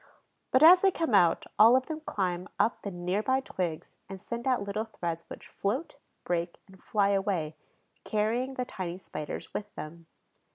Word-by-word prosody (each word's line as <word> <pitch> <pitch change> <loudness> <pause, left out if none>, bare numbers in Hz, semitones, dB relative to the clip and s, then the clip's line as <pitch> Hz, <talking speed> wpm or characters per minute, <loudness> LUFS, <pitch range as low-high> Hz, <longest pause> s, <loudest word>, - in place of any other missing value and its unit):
But 260 +3 +4
as 355 +3 +9
they 390 - +5
come 330 - -2
out, 175 -4 +4
all 225 +3 +8
of 260 0 +2
them 315 -1 -5
climb 185 - -2
up 230 - +1
the 200 - -4
near 180 +2 -2
by 260 +4 +2
twigs 175 -11 -4
and 195 -1 -7
send 235 +5 -5
out 255 -5 +2
little 205 +2 -3
threads 170 -6 -4
which - - -10
float, 250 +12 -3 0.3
break, 170 0 -2
and 190 -1 -18
fly 200 -2 +1
away, 190 -6 0 0.5
carrying 235 +5 -1
the 250 - -2
tiny 180 -6 -5
Spiders 155 -5 -7
with 210 - -5
them. 165 +2 -9
200 Hz, 175 wpm, -29 LUFS, 175-250 Hz, 0.5 s, as